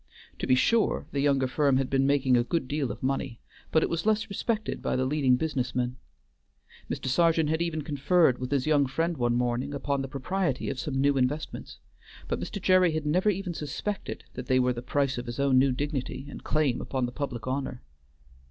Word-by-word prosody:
To - - -3
be 130 - +5
sure, 225 - +2
the 140 - -2
younger 140 -2 +3
firm 140 +1 +2
had 135 -1 0
been 135 0 +2
making 135 -2 +3
a 120 - +4
good 135 +1 -1
deal 140 -2 -1
of - - -9
money, 135 -2 -2 0.3
but 160 - +4
it - - +2
was 170 0 -1
less 215 0 +1
respected 215 +2 -2
by - - -1
the 130 - +1
leading 135 -2 +3
business 130 -3 -2
men. 125 0 -1 0.9
Mr. - - -4
Sergeant 160 +3 +3
had 160 +1 0
even 160 -3 -1
conferred 145 -1 +2
with 125 0 -4
his 135 -2 0
young 145 -3 +3
friend 165 +6 -1
one 120 -3 +1
morning 125 +3 -1
upon 140 0 -1
the 135 - -4
propriety 140 +2 -2
of 130 - -5
some 145 -3 -2
new 140 0 +3
investments; 135 +4 -2 0.5
but - - -2
Mr. 200 - -5
Gerry 185 -3 +4
had 155 -1 -2
never 180 +7 +2
even 190 -2 -2
suspected 180 +7 -4
that 125 0 -7
they 130 0 +3
were 125 0 +2
the 120 - -6
price 135 0 0
of 120 - -7
his 120 +2 -5
own 135 -2 +4
new 135 0 +4
dignity 135 -1 -3
and 145 - -9
claim 150 -5 +1
upon 130 -2 -1
the 120 - -4
public 125 -4 -4
honor. 130 -1 -3
140 Hz, 210 wpm, -28 LUFS, 130-155 Hz, 0.9 s, be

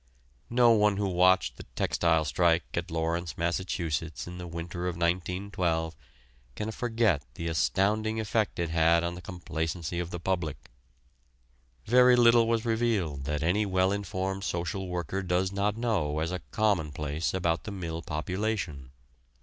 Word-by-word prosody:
No 120 0 +5
one 105 -2 +4
who 100 -1 0
watched 95 0 +3
the - - -8
textile 80 -2 +2
strike 85 +2 +2
at 85 +2 -2
Lawrence, 80 -1 -2
Massachusetts, 85 -2 -2
in 90 0 -8
the 90 - -6
winter 85 +2 -5
of 90 - -2
1912 85 -1 -1 0.6
can 110 +1 -3
forget 115 - +1
the 85 - -4
astounding 105 +7 +1
effect 110 -1 0
it 85 -2 -1
had 85 +1 +4
on 85 0 -1
the 90 - -8
complacency 85 -1 -4
of 85 -1 -3
the 90 - -5
public. 80 -8 -3 1.1
Very 125 +2 +6
little 120 -1 +6
was 115 0 +1
revealed 110 - 0
that 75 +2 -2
any 95 +6 +2
well 95 0 +2
informed 95 -1 -3
social 90 +1 -2
worker 90 +2 -3
does 90 0 0
not 100 +2 0
know 100 -11 0
as 80 +2 -1
a 90 - -2
commonplace 80 -7 0
about 85 -1 -1
the 105 - -5
mill 85 -4 -4
population. 85 - -3
90 Hz, 150 wpm, -29 LUFS, 85-100 Hz, 1.1 s, Very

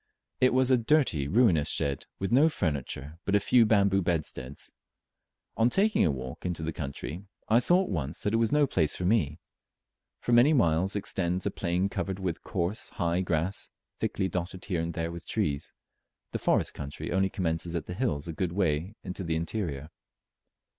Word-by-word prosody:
It 130 - +5
was 130 0 +3
a 130 - +5
dirty 115 - +2
ruinous 95 - +3
shed, 70 -1 -1
with 95 - -3
no 140 +6 +6
furniture 75 - -3
but 100 - +1
a - - +5
few 115 +2 +4
bamboo 100 -2 +3
bedsteads. 75 -6 -3 0.8
On 115 +2 +3
taking 210 - +3
a 85 - +3
walk 65 -2 -5
into 90 -3 -3
the 80 0 -2
country, 75 +5 -6 0.2
I 115 +2 +5
saw 175 +9 +4
at - - -6
once 80 -5 -3
that 105 - 0
it - - +4
was 115 -1 +2
no 150 0 +4
place 80 - +1
for 90 - -3
me. 90 -8 +2 0.8
For - - -3
many 120 +6 +6
miles 95 - +2
extends 90 -2 -1
a 100 - 0
plain 90 +1 0
covered 95 -1 -3
with 95 -4 -3
coarse 95 +4 -2
high 85 +2 0
grass, 85 +2 -1 0.3
thickly 95 - -1
dotted 90 +1 -4
here 90 -5 -1
and 85 0 -4
there 85 0 -2
with 85 0 -9
trees, 70 -2 -1 0.6
the - - -3
forest - - +1
country 70 0 -6
only 95 +1 +2
commencing 85 -2 -1
at 85 - -2
the 90 - -6
hills 90 - -1
a 85 - -4
good 85 +1 -2
way 90 +1 0
in 90 - -5
the 85 -4 -2
interior. 80 -4 -3
90 Hz, 185 wpm, -28 LUFS, 80-105 Hz, 0.8 s, no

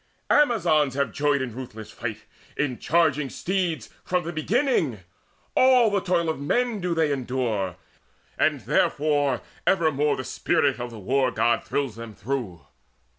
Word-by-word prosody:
Amazons 170 - +3
Have 140 -5 0
joyed 145 0 +1
in 125 -4 -5
ruthless 110 -4 -8
fight, 115 -2 -5 0.3
in 135 -4 -1
charging 150 -4 +2
steeds, 175 - -2
From 180 -1 0
the 170 +1 -5
beginning: 170 - 0 0.5
all 255 -4 +5
the 200 - +2
toil 175 -3 +1
of 160 -3 -1
men 235 +9 0
Do 175 -1 -1
they 160 -2 +2
endure; 120 -8 -1 0.6
and - - +1
therefore 145 -4 +1 0.3
evermore 150 -5 +2
The 130 - -4
spirit 145 -2 0
of 120 0 -4
the 115 - -10
War 130 +6 +1
god 115 0 +1
thrills 135 -6 -2
them 115 -2 -8
through. 110 -7 -4
145 Hz, 145 wpm, -25 LUFS, 120-170 Hz, 0.6 s, all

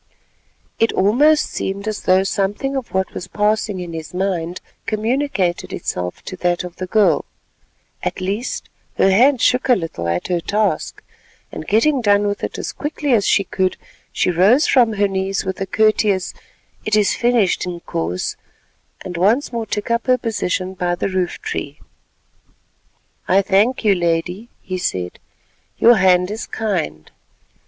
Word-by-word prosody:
It 225 - +3
almost 290 +11 +4
seemed 200 +2 -4
as 215 -1 -3
though 185 +1 +3
something 205 +8 -1
of 265 -3 -4
what 190 0 -1
was 180 - -6
passing 210 0 0
in 175 -2 -6
his 160 +1 -7
mind 180 -2 -2 0.3
communicated 215 -5 -1
itself 90 0 -4
to 185 - -7
that 175 0 0
of 180 -1 -9
the 185 - -4
girl. 185 -7 +3 0.8
At - - -3
least, 200 +6 -3 0.3
her 195 - +4
hand 250 +6 +4
shook 250 +1 +2
a 250 - +7
little 165 - -4
at 85 +1 -1
her 175 -1 0
task, 210 +5 -1 0.5
and - - -7
getting 255 +6 +3
done 205 -2 +3
with 205 0 -2
it - - -3
as - - -4
quickly 295 -2 -2
as 210 -4 +3
she 200 - +3
could, 190 -1 -1 0.3
she - - +1
rose 205 - +4
from 240 -4 +4
her 205 -1 +2
knees 195 0 -2
with 190 0 -4
a 195 - -1
courteous 215 -3 +2 0.5
"It 215 - +1
is 210 -2 +3
finished, 235 -7 +1
Inkoos," 90 - -3 0.7
and 180 - -5
once 225 +9 +2
more 230 -2 -3
took 210 +2 -3
up 235 +1 0
her 255 0 +4
position 190 -5 -2
by 175 -1 -1
the 185 - -2
roof 185 -2 -2
tree. 440 - -4 1.5
"I 195 +2 +4
thank 210 +6 +2
you, 205 - +6
Lady," 175 +5 -1
he 185 -1 -4
said; 90 - -3 0.6
"your 235 0 +6
hand 180 -1 +3
is 220 - -5
kind." 75 - -3
195 Hz, 160 wpm, -19 LUFS, 180-225 Hz, 1.5 s, a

